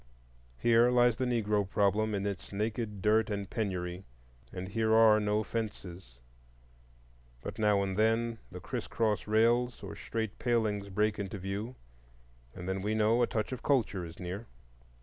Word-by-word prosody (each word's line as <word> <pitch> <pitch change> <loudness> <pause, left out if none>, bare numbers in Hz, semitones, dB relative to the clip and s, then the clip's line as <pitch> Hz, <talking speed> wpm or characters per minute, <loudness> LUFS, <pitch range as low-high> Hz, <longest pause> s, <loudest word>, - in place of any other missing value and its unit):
Here 120 - +4
lies 120 -2 +4
the 130 0 0
Negro 105 -4 0
problem 105 +1 +1
in 100 0 -2
its 100 -2 -4
naked 105 -1 -3
dirt 110 +2 +3
and 100 -1 -3
penury. 90 -4 -3 0.5
And 90 0 -6
here 110 +1 +2
are 110 -1 +7
no 105 +1 +1
fences. 95 - -6 1.3
But 110 - -6
now 105 -2 +3
and 95 -1 -2
then 115 +2 +1
the 90 - -7
crisscross 105 +2 -2
rails 120 +3 +2
or - - -7
straight 110 -2 -4
palings 110 -5 0
break 105 +2 0
into 100 0 -4
view, 100 +6 -4 0.8
and 90 - -7
then 95 0 -2
we 105 +2 -1
know 110 +2 +3
a 120 - +3
touch 110 +1 -2
of 130 -2 -5
culture 115 -9 +1
is 85 0 -9
near. 95 +6 -5
105 Hz, 155 wpm, -31 LUFS, 100-115 Hz, 1.3 s, are